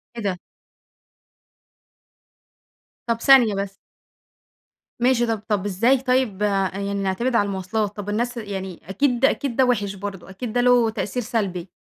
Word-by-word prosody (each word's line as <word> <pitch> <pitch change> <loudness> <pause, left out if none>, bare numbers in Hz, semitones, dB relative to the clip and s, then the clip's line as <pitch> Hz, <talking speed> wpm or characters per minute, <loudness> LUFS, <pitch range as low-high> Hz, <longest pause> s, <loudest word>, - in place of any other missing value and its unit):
إيه 235 - -5
ده؟ 190 -3 -1 2.7
طب 230 0 -1
ثانية 245 -6 +6
بس. 195 0 -4 1.2
ماشي، 240 0 +3
طب 225 -2 -1
طب 205 -3 0
إزاي 225 +7 +3
طيب 255 -6 0 0.3
يعني 200 +1 -3
نعتمد 200 +6 -1
على 205 - +3
المواصلات؟ 200 +2 -2
طب 205 0 -5
الناس 240 +4 -1
يعني 190 -5 -5
أكيد 250 +5 +2
أكيد 275 -2 0
ده 260 - +4
وِحِش 205 -5 0
برضه، 195 -2 -7
أكيد 215 +4 -6
ده 245 - +2
له 245 -2 +4
تأثير 220 +2 -3
سلبي. 195 -5 -2
215 Hz, 135 wpm, -23 LUFS, 195-245 Hz, 2.7 s, ثانية